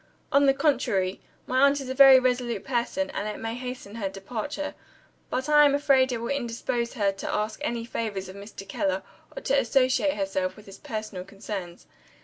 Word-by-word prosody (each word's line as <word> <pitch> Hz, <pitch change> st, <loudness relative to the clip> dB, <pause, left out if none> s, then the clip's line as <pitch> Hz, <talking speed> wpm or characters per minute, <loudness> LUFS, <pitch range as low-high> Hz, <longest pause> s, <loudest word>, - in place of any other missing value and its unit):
"On 280 Hz, 0 st, +5 dB
the 270 Hz, -, +6 dB
contrary. 200 Hz, -11 st, +1 dB, 0.2 s
My 255 Hz, -, 0 dB
aunt 280 Hz, +1 st, +5 dB
is 270 Hz, -, -6 dB
a 260 Hz, -, -2 dB
very 270 Hz, 0 st, +9 dB
resolute 250 Hz, -4 st, 0 dB
person, 265 Hz, +3 st, -1 dB
and 205 Hz, -, -3 dB
it 210 Hz, -, -5 dB
may 225 Hz, 0 st, -3 dB
hasten 250 Hz, -4 st, -7 dB
her 200 Hz, -4 st, -2 dB
departure. 230 Hz, +9 st, -5 dB, 0.6 s
But 260 Hz, +3 st, -2 dB
I 295 Hz, 0 st, +7 dB
am 285 Hz, -1 st, +5 dB
afraid 270 Hz, -2 st, +3 dB
it 245 Hz, -, -1 dB
will 235 Hz, +1 st, -4 dB
indispose 235 Hz, -2 st, -2 dB
her 205 Hz, -6 st, +1 dB
to 195 Hz, -, -5 dB
ask 215 Hz, +1 st, -2 dB
any 235 Hz, -6 st, -2 dB
favors 210 Hz, -5 st, -3 dB
of 185 Hz, -, -10 dB
Mr. 200 Hz, -1 st, -10 dB
Keller, 190 Hz, -1 st, -1 dB, 0.3 s
or -, -, -6 dB
to -, -, 0 dB
associate 270 Hz, -, +2 dB
herself 190 Hz, -2 st, -1 dB
with 210 Hz, -, -14 dB
his 195 Hz, -, -12 dB
personal 215 Hz, -4 st, -5 dB
concerns. 195 Hz, -3 st, -7 dB
235 Hz, 190 wpm, -26 LUFS, 200-265 Hz, 0.6 s, very